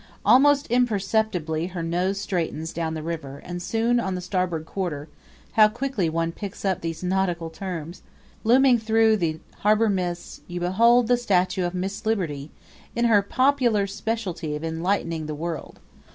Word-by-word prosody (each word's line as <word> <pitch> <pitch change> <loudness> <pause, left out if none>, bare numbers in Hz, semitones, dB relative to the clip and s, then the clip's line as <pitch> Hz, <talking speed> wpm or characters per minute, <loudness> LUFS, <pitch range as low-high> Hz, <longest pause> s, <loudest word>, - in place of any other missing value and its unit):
Almost 285 +2 +5
imperceptibly 205 -8 +1
her 180 -2 -5
nose 180 +4 0
straightens 165 -5 -3
down 160 -1 -2
the 155 - -5
river 155 -4 -5
and 175 0 -5
soon 230 +5 +1
on 190 -5 -2
the - - -3
starboard 180 -4 -2
quarter 160 -6 -4 0.4
how 215 -1 +6
quickly 235 -5 -1
one 165 +1 -1
picks 200 +2 -7
up 190 -2 0
these 165 0 -4
nautical 180 -3 -1
terms! 170 -1 -6 0.4
looming 250 +1 +5
through 220 0 +3
the 160 -4 -1 0.2
harbor 215 +2 +3
mists, 180 -3 -3
you 175 0 -5
behold 230 +7 +4
the 245 0 +4
statue 185 -5 +1
of 175 +1 -3
Miss 190 +2 -3
Liberty, 165 -10 -2 0.5
in 235 0 +1
her 215 -3 +5
popular 245 -1 +2
specialty 195 -6 -3
of 150 - -6
enlightening 165 -1 -1
the 155 - -4
world. 165 +1 -5
185 Hz, 155 wpm, -24 LUFS, 165-220 Hz, 0.5 s, how